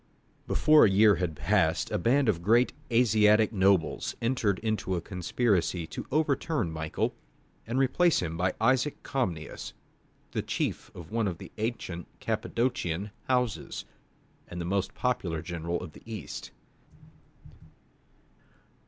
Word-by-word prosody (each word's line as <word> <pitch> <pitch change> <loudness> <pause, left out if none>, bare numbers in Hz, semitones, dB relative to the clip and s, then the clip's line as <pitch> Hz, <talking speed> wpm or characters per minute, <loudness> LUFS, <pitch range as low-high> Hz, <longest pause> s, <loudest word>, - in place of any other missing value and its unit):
Before 155 0 +5
a 110 - +6
year 105 +1 +5
had 85 -3 -2
passed - - +1
a - - 0
band 130 +8 +3
of 90 -6 +1
great 115 +7 +3 0.2
Asiatic 110 -2 +4
nobles 95 -3 +2
entered 115 -5 +1
into 110 -4 -1
a - - 0
conspiracy 90 0 0
to - - -7
overturn 150 - 0
Michael, 80 -1 -2 0.5
and 120 +3 -2
replace 135 +6 +3
him 80 -2 -3
by 90 +2 0
Isaac 130 +5 +1
Comnenus, 90 - -3 0.6
the - - -1
chief - - -3
of 85 0 -10
one 115 -2 +1
of 90 -3 -3
the - - -11
ancient 105 -6 -3
Cappadocian 100 -6 -1
houses, 125 -4 -1 0.6
and 85 - -7
the 85 - -3
most 95 +1 -1
popular 90 -11 -1
general 85 0 -3
of 75 - -8
the - - -14
East. 110 -2 -7
105 Hz, 130 wpm, -28 LUFS, 85-120 Hz, 0.6 s, a